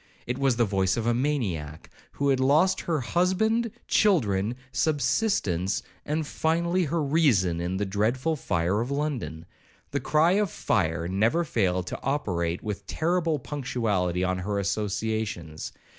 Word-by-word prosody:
It 125 +2 -3
was 135 -3 +3
the 120 0 +3
voice 95 -1 +1
of 115 - -1
a 120 - +3
maniac, 105 - -2 0.3
who 140 0 0
had 135 -1 +3
lost 155 +8 +3
her 160 -5 -1
husband, 205 - +1 0.2
children, 115 - +2 0.2
subsistence, 120 - +1 0.2
and 155 +1 -1
finally 170 +4 0
her 160 +1 0
reason, 120 - +2
in 90 +2 -2
the 105 - 0
dreadful 115 +10 0
fire 90 - 0
of 120 - -3
London. 140 - -3 0.5
The - - 0
cry 155 +3 +3
of 205 0 +2
fire 85 - 0
never 110 - +2
failed 90 - 0
to - - -6
operate 90 - -1
with 105 -2 -5
terrible 165 -1 0
punctuality 110 - -1
on 95 0 0
her 100 +2 -2
associations. 100 -4 -2
120 Hz, 145 wpm, -26 LUFS, 95-155 Hz, 0.5 s, was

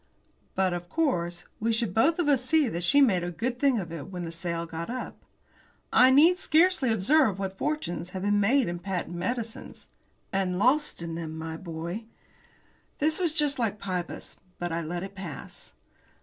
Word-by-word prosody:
But, 190 -1 +2
of 175 0 -5
course, 175 - -1
we 230 +2 +1
should 225 -4 -1
both 280 - +3
of 345 -4 0
us 275 -4 +3
see 305 +2 +3
that 175 -5 -3
she 285 +11 +5
made 190 -10 +4
a 175 - -2
good 240 +8 -3
thing 275 -3 +3
of 175 -6 -4
it 165 -4 -6
when 180 -3 -5
the 165 - -5
sale 170 0 -3
got 165 +2 -6
up. 255 +1 -6 0.7
"I 255 - +7
need 325 +7 +6
scarcely 325 -7 +3
observe 220 - +3
what 195 -1 -4
fortunes 180 - -2
have 185 0 -6
been 205 0 +2
made 245 +5 +3
in 175 0 -3
patent 180 -1 -4
medicines." 225 +5 -5 0.4
"And 190 -2 0
lost 260 - +2
in 165 -1 -5
them, 160 -1 -5
my 160 0 -5
boy." 170 +5 -6 0.9
This 310 +3 +2
was 345 -3 +2
just 295 -4 +2
like 220 -3 0
Pybus 185 -3 -4 0.2
but 175 -1 -3
I 165 +1 -1
let 175 +2 -4
it 195 - -7
pass. 180 -7 -8
195 Hz, 185 wpm, -27 LUFS, 175-260 Hz, 0.9 s, I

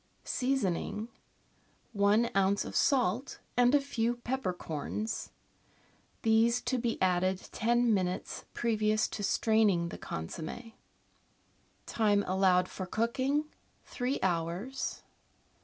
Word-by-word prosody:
Seasoning. 230 -4 -1 0.4
— - - -37 0.2
One 230 +3 +3
oz. 195 +1 +2
of - - -7
salt 255 -1 +1 0.2
and 245 +2 +5
a - - +6
few 240 -4 -1
peppercorns, 215 - -3 0.9
these 225 +2 +4
to 250 +1 -1
be 235 -1 -1
added 185 0 +1
ten 240 +1 +2
minutes 185 -2 -2
previous 215 -2 +1
to 210 - -5
straining 205 -5 +2
the - - -8
consomm^. 160 - -6 1.1
Time 205 -3 +2
allowed 185 -1 +3
for 185 - -6
cooking. 260 +8 0 0.2
— - - -38
Three 255 +2 -2
hours. 180 +9 -2
220 Hz, 105 wpm, -31 LUFS, 185-240 Hz, 1.1 s, a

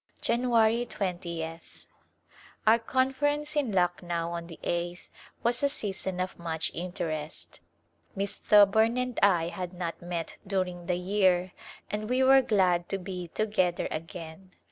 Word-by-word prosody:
January 235 -1 +3
20th. 170 -5 -5 0.8
Our 220 +2 +6
Conference 290 +5 0
in 285 -6 +1
Lucknow 175 -2 0
on 170 0 -5
the 165 - -10
eighth 175 +1 -3 0.3
was 235 +1 +2
a 280 - +3
season 190 -7 -2
of 185 -1 -3
much 160 -2 -1
interest. 160 -3 -5 0.6
Miss 200 0 -2
Thoburn 220 +3 +5
and 250 -1 -1
I 175 -4 +4
had 180 0 -5
not 175 -2 -5
met 175 -2 -4
during 180 -3 -2
the 180 -1 +1
year 185 -1 +2 0.4
and 215 +1 -3
we 255 +1 +3
were 270 +1 +7
glad 185 -7 +2
to 195 - 0
be 180 -1 -6
to 215 - +1
gether 185 -5 +1
again. 165 +3 -7
185 Hz, 140 wpm, -29 LUFS, 175-220 Hz, 0.8 s, were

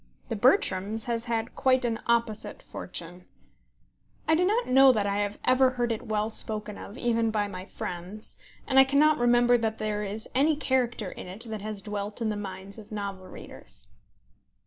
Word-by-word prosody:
The - - -1
Bertrams 215 - +3
has 235 0 -1
had 230 -1 -2
quite 260 -1 +2
an 230 -1 -1
opposite 230 -2 -1
fortune. 180 0 -7 1.0
I 320 - +4
do 335 +3 +3
not 435 +6 +2
know 265 +1 +7
that 215 -5 0
I 200 0 0
have 205 0 -1
ever 255 +1 +5
heard 240 -2 -1
it 225 +2 -4
well 215 0 0
spoken 215 -1 0
of 205 - -10
even 230 -2 +1
by 210 -2 0
my 185 -2 -7
friends, 180 +4 -6 0.3
and 265 -1 +4
I - - +10
cannot 285 +2 +3
remember 240 0 +4
that 220 -1 -1
there 210 -1 -2
is 210 +2 -3
any 295 +4 +3
character 250 -7 0
in - - -9
it 195 +6 -8
that 215 -2 -5
has 210 -2 -5
dwelt 205 0 -4
in 225 -2 0
the 210 - -1
minds 195 0 -7
of 215 0 -13
novel 200 -3 -5
readers. - - -10
220 Hz, 185 wpm, -27 LUFS, 205-245 Hz, 1.0 s, I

